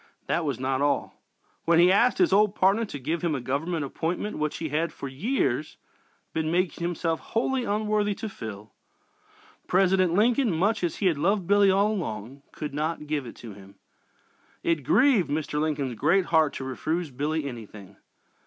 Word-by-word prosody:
That 170 Hz, -, 0 dB
was 140 Hz, -5 st, -2 dB
not 130 Hz, +1 st, -1 dB
all. 145 Hz, 0 st, 0 dB, 0.5 s
When 170 Hz, 0 st, +4 dB
he 175 Hz, +2 st, +6 dB
asked 235 Hz, +6 st, +4 dB
his 360 Hz, -, +3 dB
old 210 Hz, 0 st, +4 dB
partner 200 Hz, +5 st, +3 dB
to 175 Hz, -, -7 dB
give 155 Hz, +5 st, -3 dB
him 170 Hz, -4 st, 0 dB
a -, -, -2 dB
government 145 Hz, +5 st, -2 dB
appointment 170 Hz, +8 st, -3 dB
which 150 Hz, 0 st, -1 dB
he 160 Hz, -, -4 dB
had, 160 Hz, +3 st, 0 dB
for 140 Hz, -, -7 dB
years, 195 Hz, -, -1 dB, 0.6 s
been 160 Hz, -1 st, -1 dB
making 175 Hz, -1 st, 0 dB
himself 170 Hz, -1 st, -1 dB
wholly 250 Hz, +2 st, -1 dB
unworthy 210 Hz, -1 st, 0 dB
to 220 Hz, -, -5 dB
fill, 110 Hz, -, -8 dB, 0.9 s
President 185 Hz, -1 st, +3 dB
Lincoln, 235 Hz, +4 st, +3 dB
much 195 Hz, +5 st, +1 dB
as 170 Hz, -, 0 dB
he 205 Hz, -, -3 dB
had 165 Hz, -6 st, +2 dB
loved 190 Hz, +4 st, +1 dB
Billy 200 Hz, +1 st, +4 dB
all 200 Hz, +3 st, +3 dB
along, 130 Hz, -, -5 dB
could 150 Hz, -2 st, -6 dB
not 155 Hz, +1 st, -2 dB
give 145 Hz, -4 st, -2 dB
it -, -, -10 dB
to 115 Hz, -3 st, -10 dB
him. 100 Hz, 0 st, -15 dB, 0.9 s
It 165 Hz, -4 st, 0 dB
grieved 240 Hz, -, +4 dB
Mr. 150 Hz, 0 st, -2 dB
Lincoln's 145 Hz, -5 st, -1 dB
great 165 Hz, -, +2 dB
heart 160 Hz, -3 st, +3 dB
to -, -, -5 dB
refuse 155 Hz, +5 st, -3 dB
Billy 150 Hz, +4 st, -2 dB
anything. 105 Hz, -5 st, -10 dB
165 Hz, 175 wpm, -26 LUFS, 140-195 Hz, 0.9 s, he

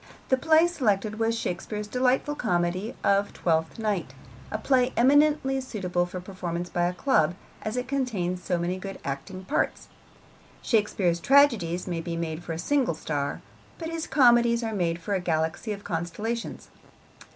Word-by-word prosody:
The 260 Hz, -, +5 dB
play 320 Hz, +4 st, +5 dB
selected 215 Hz, -, 0 dB
was 225 Hz, 0 st, +1 dB
Shakespeare's 210 Hz, +2 st, -3 dB
delightful 255 Hz, +5 st, +1 dB
comedy 185 Hz, -2 st, -1 dB
of 200 Hz, 0 st, +2 dB
Twelfth 160 Hz, -1 st, 0 dB
Night, 210 Hz, -5 st, -2 dB, 0.3 s
a -, -, -2 dB
play 255 Hz, -2 st, +2 dB
eminently 275 Hz, +1 st, +4 dB
suitable 180 Hz, -8 st, -2 dB
for 180 Hz, +1 st, -6 dB
performance 180 Hz, -2 st, -5 dB
by 175 Hz, 0 st, +1 dB
a 180 Hz, -, -2 dB
club, 180 Hz, -, +2 dB, 0.3 s
as 215 Hz, +3 st, -3 dB
it 250 Hz, 0 st, -2 dB
contains 210 Hz, -10 st, -1 dB
so 180 Hz, -, 0 dB
many 175 Hz, +2 st, -2 dB
good 195 Hz, +1 st, -6 dB
acting 160 Hz, +8 st, -5 dB
parts. 285 Hz, -, -1 dB, 0.7 s
Shakespeare's 205 Hz, -6 st, +1 dB
tragedies 225 Hz, -9 st, +4 dB
may 170 Hz, -3 st, -3 dB
be 170 Hz, 0 st, -4 dB
made 165 Hz, 0 st, -4 dB
for 165 Hz, -, -4 dB
a -, -, -4 dB
single 250 Hz, -, +1 dB
star, 145 Hz, -2 st, -3 dB, 0.4 s
but 325 Hz, -1 st, -5 dB
his 330 Hz, -1 st, -3 dB
comedies 240 Hz, -3 st, +4 dB
are 225 Hz, -1 st, -2 dB
made 170 Hz, -4 st, 0 dB
for 200 Hz, +5 st, -3 dB
a 195 Hz, -, +1 dB
galaxy 160 Hz, +4 st, -1 dB
of 205 Hz, -1 st, -5 dB
constellations. 200 Hz, +7 st, -4 dB
200 Hz, 160 wpm, -26 LUFS, 175-250 Hz, 0.7 s, The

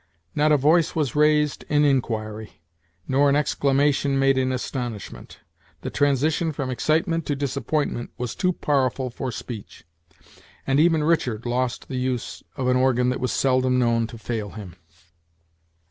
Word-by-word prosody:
Not 150 Hz, +1 st, +2 dB
a 150 Hz, -, +6 dB
voice 155 Hz, +4 st, +3 dB
was 150 Hz, -6 st, -1 dB
raised 150 Hz, 0 st, +2 dB
in 150 Hz, 0 st, +3 dB
inquiry, 110 Hz, -, -2 dB, 0.4 s
nor 140 Hz, +2 st, +3 dB
an 140 Hz, -, +3 dB
exclamation 140 Hz, -1 st, +1 dB
made 135 Hz, 0 st, +3 dB
in 130 Hz, 0 st, +1 dB
astonishment. 125 Hz, -5 st, -5 dB, 0.4 s
The -, -, -5 dB
transition 150 Hz, +3 st, +1 dB
from 135 Hz, -3 st, -4 dB
excitement 165 Hz, -, 0 dB
to 145 Hz, -, 0 dB
disappointment 140 Hz, -2 st, -2 dB
was 125 Hz, -1 st, -3 dB
too 185 Hz, -1 st, +1 dB
powerful 130 Hz, -5 st, 0 dB
for 125 Hz, +1 st, -4 dB
Speech; 115 Hz, -3 st, -8 dB, 0.8 s
and 135 Hz, +1 st, +2 dB
even 160 Hz, -1 st, +4 dB
Richard 125 Hz, -9 st, 0 dB
lost 125 Hz, 0 st, -2 dB
the 130 Hz, -, -4 dB
use 125 Hz, -2 st, -3 dB
of 130 Hz, -3 st, -2 dB
an 125 Hz, 0 st, +3 dB
organ 125 Hz, -1 st, +2 dB
that 125 Hz, -, -1 dB
was 125 Hz, -, -1 dB
seldom 130 Hz, -1 st, +2 dB
known 115 Hz, -2 st, +2 dB
to 115 Hz, -, -10 dB
fail 110 Hz, -2 st, -4 dB
him. 100 Hz, -5 st, -10 dB
130 Hz, 150 wpm, -24 LUFS, 125-150 Hz, 0.8 s, a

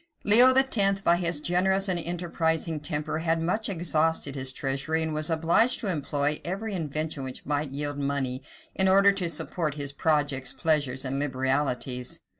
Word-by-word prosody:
Leo 240 Hz, +5 st, +7 dB
X., 210 Hz, -7 st, +2 dB
by 170 Hz, -2 st, +3 dB
his 170 Hz, -3 st, -1 dB
generous 190 Hz, +4 st, +1 dB
and 180 Hz, -2 st, 0 dB
enterprising 165 Hz, -1 st, -1 dB
temper, 150 Hz, +1 st, -2 dB
had 165 Hz, 0 st, 0 dB
much 195 Hz, +7 st, -1 dB
exhausted 160 Hz, -5 st, 0 dB
his 130 Hz, -1 st, -1 dB
treasury, 140 Hz, +5 st, -2 dB
and 160 Hz, -1 st, -3 dB
was 155 Hz, +1 st, 0 dB
obliged 165 Hz, +10 st, +2 dB
to 205 Hz, -, 0 dB
employ 145 Hz, -2 st, -1 dB
every 200 Hz, +5 st, -4 dB
invention 155 Hz, -3 st, -3 dB
which 130 Hz, -1 st, -7 dB
might 145 Hz, 0 st, -2 dB
yield 145 Hz, +1 st, -4 dB
money, 140 Hz, -2 st, -2 dB, 0.3 s
in 190 Hz, -, +2 dB
order 195 Hz, +1 st, +5 dB
to 190 Hz, -3 st, -1 dB
support 155 Hz, -1 st, -1 dB
his 145 Hz, -2 st, -4 dB
projects, 145 Hz, -3 st, 0 dB
pleasures, 145 Hz, -5 st, 0 dB
and 135 Hz, +1 st, -2 dB
liberalities. 130 Hz, -2 st, -2 dB
155 Hz, 160 wpm, -26 LUFS, 140-180 Hz, 0.3 s, Leo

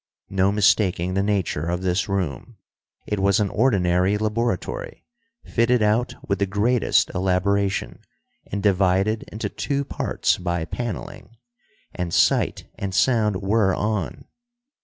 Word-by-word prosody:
No 95 Hz, 0 st, +2 dB
mistaking 95 Hz, -3 st, +2 dB
the 95 Hz, -, +1 dB
nature 95 Hz, -6 st, -1 dB
of 90 Hz, +2 st, -2 dB
this 90 Hz, +2 st, 0 dB
room; 90 Hz, -10 st, -3 dB, 0.5 s
it 105 Hz, -, -2 dB
was 100 Hz, +1 st, +3 dB
an 105 Hz, -2 st, +1 dB
ordinary 95 Hz, -5 st, +2 dB
laboratory, 115 Hz, -, -3 dB, 0.4 s
fitted 115 Hz, 0 st, +2 dB
out 110 Hz, +4 st, +1 dB
with 100 Hz, -2 st, 0 dB
the 100 Hz, -, +1 dB
greatest 110 Hz, +5 st, +2 dB
elaboration, 95 Hz, +2 st, 0 dB, 0.5 s
and 100 Hz, 0 st, -3 dB
divided 100 Hz, +2 st, +2 dB
into 110 Hz, -, -3 dB
two 140 Hz, 0 st, -2 dB
parts -, -, -1 dB
by 85 Hz, -2 st, -2 dB
paneling. 115 Hz, +2 st, -6 dB, 0.6 s
And 90 Hz, -1 st, -4 dB
sight -, -, +2 dB
and 95 Hz, -1 st, -3 dB
sound 105 Hz, -6 st, +2 dB
were 100 Hz, -1 st, +2 dB
on. 105 Hz, -4 st, -2 dB
100 Hz, 125 wpm, -23 LUFS, 95-110 Hz, 0.6 s, was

